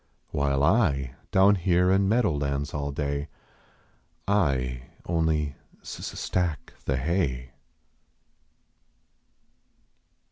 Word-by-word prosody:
While 70 Hz, -1 st, +1 dB
I, 75 Hz, -, +2 dB, 0.2 s
down 95 Hz, +2 st, +5 dB
here 90 Hz, -1 st, +2 dB
in 95 Hz, 0 st, +3 dB
meadow 115 Hz, -3 st, +3 dB
lands 70 Hz, 0 st, -2 dB
all 70 Hz, -1 st, -2 dB
day, 70 Hz, 0 st, -2 dB, 1.0 s
I 65 Hz, -10 st, 0 dB, 0.2 s
onlv 80 Hz, -4 st, +1 dB, 0.3 s
s -, -, -7 dB
s -, -, -6 dB
stack 85 Hz, -6 st, -2 dB
the 65 Hz, -, 0 dB
hav. 65 Hz, -4 st, -1 dB
75 Hz, 95 wpm, -26 LUFS, 70-90 Hz, 1.0 s, down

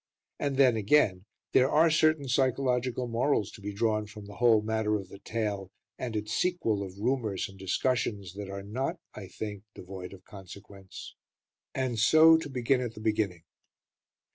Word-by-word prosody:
And 140 Hz, -2 st, -1 dB
then, 130 Hz, -4 st, +5 dB
again, 100 Hz, -4 st, +2 dB, 0.3 s
there 130 Hz, +1 st, +4 dB
are 160 Hz, +2 st, +4 dB
certain 155 Hz, -2 st, +3 dB
psychological 125 Hz, -1 st, 0 dB
morals 115 Hz, -2 st, 0 dB
to -, -, -13 dB
be 105 Hz, +1 st, -4 dB
drawn 105 Hz, 0 st, 0 dB
from 105 Hz, -1 st, -11 dB
the 100 Hz, -, -11 dB
whole 115 Hz, -3 st, +4 dB
matter 110 Hz, -1 st, 0 dB
of 100 Hz, -2 st, -5 dB
the 100 Hz, -, -11 dB
tale 105 Hz, -4 st, -3 dB, 0.3 s
and 120 Hz, -3 st, -4 dB
its 105 Hz, 0 st, -3 dB
sequel 175 Hz, -, 0 dB
of 95 Hz, -1 st, -7 dB
rumours 110 Hz, -3 st, -1 dB
and 95 Hz, -1 st, -15 dB
discussions 100 Hz, -1 st, -1 dB
that 100 Hz, 0 st, -7 dB
are 100 Hz, 0 st, -6 dB
not, 130 Hz, -, -3 dB, 0.2 s
I 100 Hz, -3 st, -8 dB
think, 105 Hz, +1 st, -6 dB
devoid 95 Hz, 0 st, -8 dB
of 95 Hz, -1 st, -14 dB
consequence; 95 Hz, 0 st, -11 dB, 0.6 s
and 130 Hz, -4 st, -1 dB
so 160 Hz, +7 st, +7 dB
to 160 Hz, -2 st, -6 dB
begin 130 Hz, 0 st, +1 dB
at 120 Hz, -2 st, -4 dB
the -, -, -9 dB
beginning. 105 Hz, -6 st, -1 dB
110 Hz, 165 wpm, -29 LUFS, 100-130 Hz, 0.6 s, so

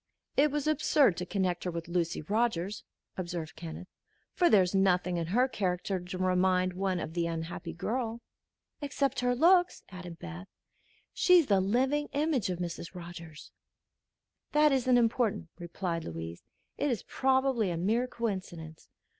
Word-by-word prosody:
"It 295 Hz, +2 st, +4 dB
was 295 Hz, 0 st, -2 dB
absurd 295 Hz, -, +3 dB
to 180 Hz, -, -4 dB
connect 185 Hz, -3 st, -1 dB
her 180 Hz, -, -2 dB
with 170 Hz, -1 st, -5 dB
Lucy 170 Hz, -2 st, -1 dB
Rogers," 210 Hz, 0 st, -1 dB, 0.3 s
observed 170 Hz, -3 st, -4 dB
Kenneth, 165 Hz, +2 st, -8 dB, 0.5 s
"for 350 Hz, -1 st, +3 dB
there 200 Hz, -3 st, +6 dB
is 180 Hz, -, -3 dB
nothing 180 Hz, -2 st, +2 dB
in 165 Hz, -1 st, -2 dB
her 245 Hz, +9 st, +3 dB
character 190 Hz, -4 st, -1 dB
to 180 Hz, +1 st, -7 dB
remind 185 Hz, 0 st, +2 dB
one 185 Hz, -1 st, -1 dB
of 160 Hz, -, -5 dB
the 170 Hz, -1 st, 0 dB
unhappy 165 Hz, 0 st, -5 dB
girl." 225 Hz, +6 st, -3 dB, 0.6 s
"Except 280 Hz, -2 st, -1 dB
her 245 Hz, 0 st, +1 dB
looks," 355 Hz, +6 st, +4 dB
added 180 Hz, -3 st, -9 dB
Beth. 180 Hz, +2 st, -8 dB, 0.7 s
"She's 360 Hz, -3 st, +5 dB
the 200 Hz, -6 st, +3 dB
living 265 Hz, +9 st, +1 dB
image 285 Hz, -, +1 dB
of 180 Hz, -, -2 dB
Mrs. 170 Hz, 0 st, -5 dB
Rogers." 170 Hz, -3 st, -10 dB, 1.0 s
"That 300 Hz, 0 st, +5 dB
isn't 255 Hz, -2 st, +3 dB
important," 230 Hz, -6 st, +1 dB
replied 170 Hz, -1 st, -3 dB
Louise. 80 Hz, 0 st, -6 dB, 0.4 s
"It 290 Hz, -, +1 dB
is 240 Hz, -5 st, -1 dB
probably 265 Hz, -5 st, +1 dB
a 170 Hz, -, -2 dB
mere 225 Hz, +8 st, +1 dB
coincidence. 185 Hz, -9 st, -5 dB
185 Hz, 150 wpm, -30 LUFS, 175-250 Hz, 1.0 s, there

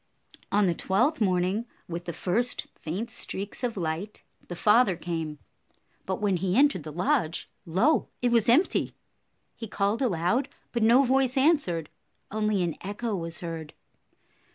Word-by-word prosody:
On 205 Hz, 0 st, +4 dB
the 175 Hz, -, +2 dB
twelfth 240 Hz, -, +1 dB
morning, 190 Hz, +3 st, +1 dB, 0.2 s
with 175 Hz, 0 st, -5 dB
the 170 Hz, -, -3 dB
first 220 Hz, +9 st, -1 dB
faint 200 Hz, +9 st, -4 dB
streaks 205 Hz, +1 st, -5 dB
of 235 Hz, -4 st, -1 dB
light, 170 Hz, +4 st, -4 dB, 0.2 s
the 175 Hz, -, -6 dB
father 210 Hz, +1 st, +4 dB
came, 165 Hz, -2 st, -4 dB, 0.7 s
but 190 Hz, -, -2 dB
when 200 Hz, -3 st, +1 dB
he 185 Hz, +3 st, 0 dB
entered 285 Hz, -, +4 dB
the 155 Hz, +1 st, -8 dB
lodge, 165 Hz, 0 st, 0 dB, 0.2 s
lo, 225 Hz, -, +2 dB
it 245 Hz, -1 st, +1 dB
was 235 Hz, -1 st, +3 dB
empty! 295 Hz, +11 st, +3 dB, 0.6 s
He 225 Hz, -, -7 dB
called 205 Hz, +4 st, 0 dB
aloud, 235 Hz, +4 st, +1 dB, 0.2 s
but 235 Hz, -, -1 dB
no 235 Hz, +5 st, +6 dB
voice 265 Hz, 0 st, +2 dB
answered. 265 Hz, -, +2 dB, 0.4 s
Only 210 Hz, -2 st, +1 dB
an 170 Hz, -3 st, -2 dB
echo 205 Hz, +3 st, -3 dB
was 165 Hz, -2 st, -5 dB
heard. 165 Hz, -3 st, -6 dB
200 Hz, 150 wpm, -27 LUFS, 175-240 Hz, 0.7 s, no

